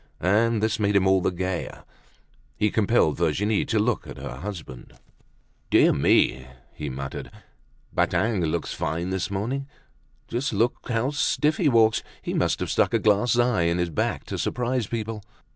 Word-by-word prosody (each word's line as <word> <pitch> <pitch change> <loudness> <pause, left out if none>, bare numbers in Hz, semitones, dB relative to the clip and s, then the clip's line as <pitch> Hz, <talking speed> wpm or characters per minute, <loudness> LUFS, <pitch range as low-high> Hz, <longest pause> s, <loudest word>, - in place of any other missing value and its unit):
And 110 +4 +2
this 110 -1 0
made 100 -1 +1
him 95 -1 +4
all 95 0 +4
the - - +1
gayer. 90 0 -4 0.7
He 105 -1 +1
compelled 110 -7 +2
Virginie 95 +6 +1
to 110 - 0
look 110 +2 0
at - - -9
her 60 - -7
husband. 80 -8 -8 0.8
"Dear - - +5
me," 65 +1 +2 0.3
he 75 -2 -5
muttered, 70 +1 -6 0.6
"Badingue 105 -5 +1
looks - - -2
fine 85 +3 -2
this 95 +1 -2
morning! 120 +8 -3 0.6
Just 125 +2 -2
look, 115 +4 0
see 125 - -2
how 120 +5 +1
stiff 150 +1 +1
he 160 - +3
walks. 110 -3 +4 0.2
He - - -5
must - - +1
have - - -2
stuck - - +2
a - - +3
glass 105 +3 +2
eye 120 -8 +2
in 85 +1 +1
his 90 -1 -1
back 75 - -1
to - - -5
surprise 125 -2 -1
people." 110 -1 -4
105 Hz, 170 wpm, -25 LUFS, 90-115 Hz, 0.8 s, Dear